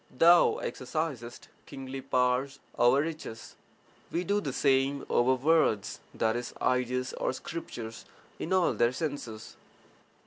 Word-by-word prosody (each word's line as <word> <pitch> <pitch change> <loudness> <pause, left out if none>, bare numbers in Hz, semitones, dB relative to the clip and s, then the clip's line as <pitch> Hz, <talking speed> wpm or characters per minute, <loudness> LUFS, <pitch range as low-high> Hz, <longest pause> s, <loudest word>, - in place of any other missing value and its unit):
Thou 170 +5 +5
exercisest 130 -4 -4 0.3
kingly 135 0 -7
power 125 0 +1 0.3
over 120 +3 +4
riches, 155 -8 -6 0.6
we 175 - -1
do 205 +3 +1
the 145 - -3
same 135 +1 +2
over 130 +2 +4
words 140 -7 +2 0.2
(i.e., 115 +2 +1 0.2
ideas 125 0 0
or - - -1
scriptures) 120 -7 -7 0.3
in 165 - -4
all 185 -2 +3
their 120 +1 +2
senses. 130 -8 -5
130 Hz, 115 wpm, -29 LUFS, 120-155 Hz, 0.6 s, Thou